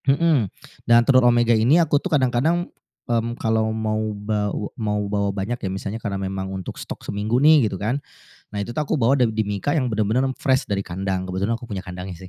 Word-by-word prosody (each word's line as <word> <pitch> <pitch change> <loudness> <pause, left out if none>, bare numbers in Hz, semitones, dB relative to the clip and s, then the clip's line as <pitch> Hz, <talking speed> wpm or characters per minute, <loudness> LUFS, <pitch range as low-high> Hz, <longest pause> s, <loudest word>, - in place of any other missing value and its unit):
Mhm, 140 - +3 0.4
dan 120 0 +6
telur 130 -2 +5
omega 120 -1 +3
ini 115 +8 +4
aku 155 -4 +3
tuh 190 - -3
kadang-kadang, 150 +4 +2 0.4
mmm, 120 0 -1
kalau 110 -1 +1
mau 110 -1 -1 0.2
baw 105 0 -2
mau 105 -2 -2
bawa 100 0 0
banyak 100 +5 -3
ya, 95 - -2
misalnya 100 +4 -5
karena 100 -2 -3
memang 95 0 -4
untuk 95 -2 -6
stok - - -8
seminggu 105 +4 -1
nih 145 -4 +5
gitu 95 - -5
kan. 120 +9 -2 0.5
Nah 105 - -3
itu 120 +4 -5
tuh 155 - +1
aku 150 0 -1
bawa 125 +4 +4
da 125 - +3
di 110 -1 -1
mika 105 +6 -1
yang 140 -5 +1
bener-bener 110 +2 +1 0.2
fresh 130 -1 +1
dari 100 -1 -1
kandang, 95 +1 -3
kebetulan 95 +5 -1
aku 120 - -11
punya 105 -5 -5
kandangnya 90 0 -8
110 Hz, 205 wpm, -22 LUFS, 100-125 Hz, 0.5 s, dan